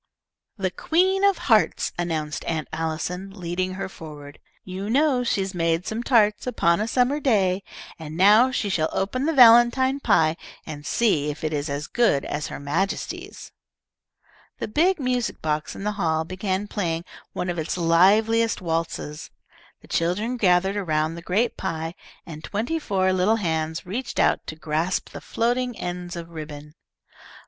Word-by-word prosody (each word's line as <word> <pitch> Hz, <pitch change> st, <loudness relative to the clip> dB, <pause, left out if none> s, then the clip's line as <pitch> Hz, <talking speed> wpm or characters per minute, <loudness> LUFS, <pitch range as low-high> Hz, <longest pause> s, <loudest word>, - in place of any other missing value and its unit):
"The 190 Hz, -2 st, -1 dB
Queen 375 Hz, -, +1 dB
of 400 Hz, -3 st, +4 dB
Hearts," 220 Hz, -4 st, +2 dB
announced 160 Hz, -4 st, -3 dB
Aunt 160 Hz, -2 st, -2 dB
Allison, 165 Hz, +4 st, -3 dB
leading 185 Hz, +2 st, -2 dB
her 195 Hz, 0 st, -4 dB
forward. 150 Hz, -5 st, -11 dB, 0.2 s
"You 190 Hz, +2 st, -6 dB
know 270 Hz, 0 st, +3 dB
'she 200 Hz, -5 st, 0 dB
made 165 Hz, 0 st, 0 dB
some 220 Hz, +2 st, -3 dB
tarts, 215 Hz, -3 st, +2 dB
upon 170 Hz, -7 st, +2 dB
a 215 Hz, -, -1 dB
summer 255 Hz, +5 st, +1 dB
day,' 200 Hz, -9 st, +2 dB, 0.4 s
and 160 Hz, 0 st, -7 dB
now 210 Hz, +7 st, +6 dB
she 250 Hz, -4 st, -1 dB
shall 160 Hz, -5 st, 0 dB
open 255 Hz, +9 st, -1 dB
the -, -, +3 dB
valentine 245 Hz, +2 st, +6 dB
pie 160 Hz, -, +3 dB, 0.3 s
and 145 Hz, -2 st, -8 dB
see 160 Hz, -11 st, +1 dB
if 150 Hz, +2 st, -6 dB
it 155 Hz, 0 st, -1 dB
is 145 Hz, 0 st, -2 dB
as 145 Hz, +1 st, -3 dB
good 230 Hz, -, +1 dB
as 145 Hz, 0 st, -3 dB
her -, -, -7 dB
Majesty's." 165 Hz, +8 st, -3 dB, 1.1 s
The -, -, -4 dB
big 335 Hz, -, +2 dB
music 250 Hz, -3 st, -1 dB
box 150 Hz, -1 st, -2 dB
in -, -, -7 dB
the 210 Hz, -, 0 dB
hall 160 Hz, -2 st, +1 dB
began 190 Hz, +3 st, -3 dB
playing 170 Hz, -5 st, -2 dB, 0.3 s
one 180 Hz, -, -2 dB
of 175 Hz, -, -4 dB
its 160 Hz, +3 st, -3 dB
liveliest 210 Hz, +7 st, +3 dB
waltzes, 165 Hz, -3 st, -3 dB, 0.5 s
the -, -, -16 dB
children 195 Hz, +9 st, 0 dB
gathered 190 Hz, -2 st, +2 dB
around 155 Hz, -4 st, 0 dB
the 170 Hz, -, -8 dB
great 205 Hz, +8 st, 0 dB
pie, 160 Hz, 0 st, -3 dB, 0.3 s
and 155 Hz, -1 st, -9 dB
twenty 235 Hz, +11 st, -2 dB
four 190 Hz, -8 st, +1 dB
little 185 Hz, +4 st, +3 dB
hands 160 Hz, -5 st, -2 dB
reached 235 Hz, +8 st, -4 dB
out -, -, +2 dB
to 155 Hz, -, -5 dB
grasp 160 Hz, +3 st, -2 dB
the -, -, -9 dB
floating 245 Hz, +1 st, -1 dB
ends 175 Hz, 0 st, -5 dB
of 170 Hz, -1 st, -7 dB
ribbon. 150 Hz, -2 st, -8 dB
185 Hz, 160 wpm, -24 LUFS, 160-225 Hz, 1.1 s, now